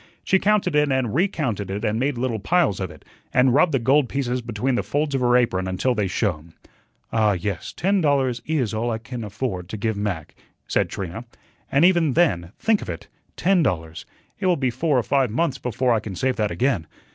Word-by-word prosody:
She 190 - +3
counted 200 -5 +2
it 150 -1 +3
and 130 -5 0
recounted 140 - -1
it 100 +3 -3
and 105 +2 0
made 135 0 0
little 120 -2 -1
piles 105 - +1
of 95 -2 -3
it, - - -15 0.3
and 125 0 +4
rubbed 155 +4 +4
the 135 - +2
gold 135 +3 +3
pieces 125 -2 -1
between 120 +3 -2
the 120 - +1
folds 145 0 -1
of 135 - 0
her 125 0 +4
apron 95 -7 +1
until 95 +8 0
they 105 -4 0
shone. 85 -4 -2 0.6
"Ah, 110 -2 +3
yes, 95 0 -4
ten 195 +1 +1
dollars 135 -5 +1
is 135 -9 0
all 115 +2 -1
I 115 - -1
can 120 +1 -7
afford 105 -4 -4
to 110 - -5
give 110 +1 -1
Mac," 100 -7 -3 0.3
said - - +1
Trina, 95 +5 -6 0.5
"and 140 +5 +5
even 170 -6 +3
then, 90 - +2
think 220 -2 +2
of - - -7
it, 85 - -7 0.3
ten 185 +1 +3
dollars 80 - -2 0.3
it 190 - 0
will 180 -2 +3
be 130 -2 0
four 140 +3 +1
or 120 - +2
five 135 +1 +2
months 135 +3 -1
before 125 +1 0
I 115 - +2
can 105 -3 -7
save 130 +8 0
that 105 -2 +1
again. 120 - 0
125 Hz, 215 wpm, -23 LUFS, 105-140 Hz, 0.6 s, and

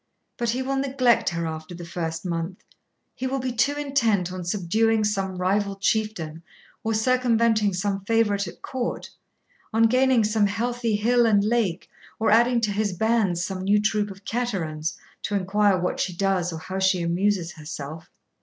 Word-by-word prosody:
But 235 -1 -1
he 250 +3 0
will 270 +1 -1
neglect 260 -5 +2
her 170 -1 -3
after 160 +2 -6
the 175 0 -8
first 165 0 -4
month; 170 +1 -3 0.5
he 260 - -3
will 270 +1 -1
be 255 -1 -2
too 245 +5 +1
intent 235 -11 +1
on 185 -1 -5
subduing 215 +5 +1
some 195 -3 -1
rival 195 +2 0
chieftain 195 -6 -1 0.4
or 225 0 0
circumventing 230 -3 +2
some 195 +1 -2
favourite 205 -3 +2
at - - -11
court, 255 -2 -4 0.6
on 225 0 +3
gaining 255 0 +4
some 210 -1 +2
heathy 230 +1 -1
hill 235 +3 +3
and 205 -2 +4
lake 210 -5 0 0.3
or 220 - +1
adding 235 +2 +4
to 215 -2 +1
his 205 -1 -1
bands 200 -3 +1
some 190 -1 -4
new 200 +2 +3
troop 210 0 0
of 195 0 -12
caterans, 170 -10 -2 0.2
to 205 - -2
inquire 200 +1 +2
what 180 0 -2
she 180 - -1
does, 185 -2 0
or 165 - -5
how 185 +4 -5
she 190 -2 +2
amuses 175 +1 0
herself. 155 0 -8
205 Hz, 170 wpm, -24 LUFS, 180-230 Hz, 0.6 s, gaining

